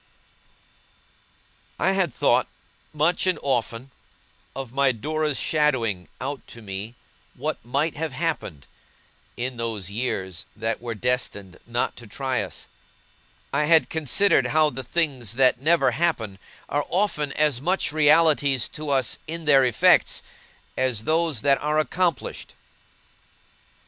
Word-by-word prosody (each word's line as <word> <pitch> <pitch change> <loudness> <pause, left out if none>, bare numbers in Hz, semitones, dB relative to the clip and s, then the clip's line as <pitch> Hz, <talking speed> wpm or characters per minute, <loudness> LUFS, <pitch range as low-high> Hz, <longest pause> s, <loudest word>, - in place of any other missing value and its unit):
I 190 - +3
had 190 -5 +1
thought, - - +2 0.4
much 155 +5 +1
and 185 - +2
often, 125 -1 -2 0.6
of 135 -3 -6
my 140 -1 +3
Dora's 150 +4 -2
shadowing 125 - 0
out 135 +2 -4
to 115 - -12
me 100 +4 -6 0.4
what - - -4
might 140 +7 -1
have 160 -1 -2
happened, 140 - -3 0.7
in 125 +1 -3
those 110 -5 -3
years 95 -6 -3
that 115 +1 -2
were 120 -1 -4
destined 105 -5 -2
not 120 +1 -1
to 120 - -11
try 130 +4 -2
us; - - -6 0.9
I 150 +2 +2
had 160 +1 +4
considered 160 -1 +3
how 155 +2 +3
the 130 +1 -6
things 130 - -1
that 130 -1 +3
never 160 -3 +3
happen, 120 - -1 0.3
are 145 +1 -1
often 175 -7 0
as 150 -5 +1
much 180 +3 +1
realities 150 -4 +4
to 155 -1 -6
us, 135 -4 +1
in 165 +1 -6
their 140 -3 +6
effects, 125 -3 +4 0.5
as 125 -5 0
those 160 -3 +1
that 140 -1 +3
are 150 +1 0
accomplished. 165 -2 -1
135 Hz, 130 wpm, -24 LUFS, 120-155 Hz, 0.9 s, their